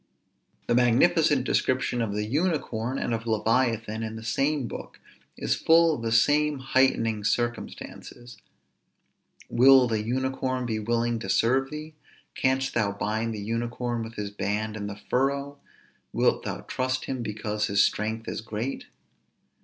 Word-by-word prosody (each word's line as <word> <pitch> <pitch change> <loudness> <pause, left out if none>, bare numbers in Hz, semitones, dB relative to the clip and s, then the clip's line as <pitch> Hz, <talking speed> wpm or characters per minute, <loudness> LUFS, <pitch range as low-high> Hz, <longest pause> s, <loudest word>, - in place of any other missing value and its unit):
_ - - -35
The - - +1
magnificent 135 +4 +4
description 130 -1 0
of 105 -3 -2
the 105 0 -1
unicorn 135 -4 -1
and 120 - -2
of 115 0 -3
leviathan, 115 0 0
in 110 0 -4
the 110 - -8
same 135 +3 0
book, - - -9 0.4
is - - 0
full 165 0 +4
of 120 - -4
the 115 -1 -2
same 145 +6 +3
heightening 130 -5 +1
circumstances: 120 +1 -4 1.1
_Will 130 0 +7
the 110 -2 0
unicorn 130 +2 -2
be 110 -2 -2
willing 115 +1 0
to 95 - -6
serve 130 +7 +2
thee? 155 +1 -7 0.4
canst 130 +1 0
thou 110 -3 +1
bind 110 +2 -2
the 105 - -5
unicorn 120 +2 -2
with 115 +1 -7
his 105 -1 -4
band 105 +2 -2
in 100 -1 -4
the 100 - -6
furrow? 140 +5 -1 0.5
wilt - - +1
thou - - -4
trust 130 0 -2
him 130 -2 -3
because 105 -1 -2
his 100 0 +4
strength 110 +2 -1
is - - -4
great? 110 +4 -5
120 Hz, 150 wpm, -26 LUFS, 110-130 Hz, 1.1 s, Will